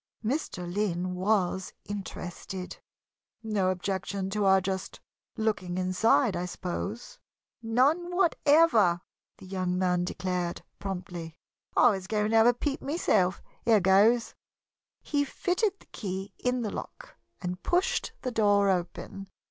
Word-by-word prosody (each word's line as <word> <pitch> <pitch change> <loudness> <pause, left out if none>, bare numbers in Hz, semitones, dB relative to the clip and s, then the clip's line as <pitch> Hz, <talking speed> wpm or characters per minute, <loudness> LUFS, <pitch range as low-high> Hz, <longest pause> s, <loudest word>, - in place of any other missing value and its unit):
Mr. 235 - -2
Lynn 180 -1 -1
was 190 -1 0
interested. 190 -2 -6 0.6
"No 205 -4 +1
objection 190 +1 -2
to 210 0 0
our 190 0 +6
just 190 0 -4 0.4
looking 200 -5 -1
inside, 185 +4 +3
I 175 +1 -2
suppose?" 210 - -5 0.4
"None 265 +10 +2
whatever," 290 - +4 0.4
the - - -13
young 185 -1 -2
man 180 -1 +2
declared, 180 -1 -3 0.2
promptly. 180 -4 -5 0.4
"I 245 - +7
was 190 -2 -4
going 210 0 0
to 225 - +4
have 225 +1 +6
a 245 - +6
peep 280 +2 -2
myself. 215 - +1 0.2
Here 225 -2 +5
goes!" 200 +6 +4 0.7
He 290 -1 +1
fitted 370 +7 -1
the - - -20
key 195 -1 -5
in 250 -1 0
the 210 - -2
lock - - -8 0.2
and 180 +1 -4
pushed 385 +8 0
the 255 - -1
door 205 -3 +3
open. 190 +2 -4
195 Hz, 130 wpm, -28 LUFS, 185-235 Hz, 0.7 s, I